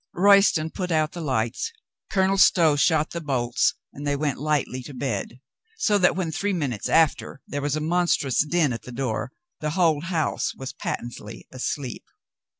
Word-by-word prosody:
Royston 195 Hz, -4 st, +5 dB
put 180 Hz, -2 st, -4 dB
out 155 Hz, -1 st, +1 dB
the 175 Hz, -, -7 dB
lights, 130 Hz, -, -1 dB, 0.4 s
Colonel 190 Hz, -1 st, +2 dB
Stow 165 Hz, -4 st, +5 dB
shot 155 Hz, +1 st, +2 dB
the 170 Hz, -, -4 dB
bolts, 125 Hz, -5 st, +1 dB, 0.2 s
and 145 Hz, +1 st, -6 dB
they 145 Hz, -, +1 dB
went 145 Hz, -2 st, -1 dB
lightly 145 Hz, -3 st, -1 dB
to 135 Hz, +2 st, -10 dB
bed. 120 Hz, -2 st, -3 dB, 0.4 s
So 210 Hz, -, +2 dB
that 180 Hz, -, +4 dB
when 180 Hz, -4 st, -2 dB
three 200 Hz, +6 st, -1 dB
minutes 140 Hz, -, -2 dB
after 160 Hz, -3 st, +2 dB
there 145 Hz, -, -4 dB
was 145 Hz, 0 st, -1 dB
a 155 Hz, -, -2 dB
monstrous 165 Hz, -5 st, +1 dB
din 155 Hz, -3 st, +1 dB
at 115 Hz, -, -5 dB
the 125 Hz, -, -10 dB
door, 125 Hz, -1 st, -3 dB, 0.3 s
the 155 Hz, -, -2 dB
whole 160 Hz, -5 st, +3 dB
house 170 Hz, -3 st, -1 dB
was 130 Hz, -1 st, -7 dB
patently 115 Hz, -2 st, -6 dB
asleep. 130 Hz, 0 st, -4 dB
150 Hz, 170 wpm, -24 LUFS, 130-170 Hz, 0.4 s, Royston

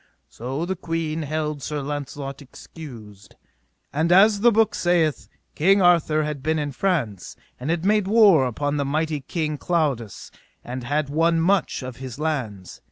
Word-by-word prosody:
So 135 Hz, +7 st, -4 dB
the 190 Hz, +2 st, -2 dB
queen 165 Hz, -2 st, -3 dB
held 150 Hz, -1 st, -3 dB
Sir 150 Hz, +2 st, -3 dB
Launcelot 140 Hz, -1 st, -5 dB
excused. 115 Hz, -, -12 dB, 0.6 s
And 160 Hz, +4 st, +1 dB
as 200 Hz, +3 st, +6 dB
the 240 Hz, +1 st, +6 dB
book 225 Hz, 0 st, +3 dB
saith, 170 Hz, -4 st, +1 dB, 0.3 s
King 195 Hz, +6 st, +4 dB
Arthur 170 Hz, -4 st, +3 dB
had 150 Hz, -2 st, -4 dB
been 160 Hz, +3 st, 0 dB
in 145 Hz, -1 st, -2 dB
France, 135 Hz, -, -2 dB, 0.2 s
and 130 Hz, +5 st, -4 dB
had 170 Hz, +1 st, -1 dB
made 210 Hz, -1 st, +2 dB
war 200 Hz, -, +5 dB
upon 145 Hz, +4 st, -2 dB
the 140 Hz, -, 0 dB
mighty 155 Hz, +2 st, -1 dB
King 155 Hz, +1 st, -3 dB
Claudas, 140 Hz, -, -2 dB, 0.3 s
and 125 Hz, +1 st, -6 dB
had 145 Hz, +3 st, -1 dB
won 165 Hz, +2 st, +2 dB
much 180 Hz, -4 st, +1 dB
of 125 Hz, -1 st, -7 dB
his 130 Hz, -2 st, -8 dB
lands. 125 Hz, -, -4 dB
150 Hz, 160 wpm, -23 LUFS, 135-170 Hz, 0.6 s, as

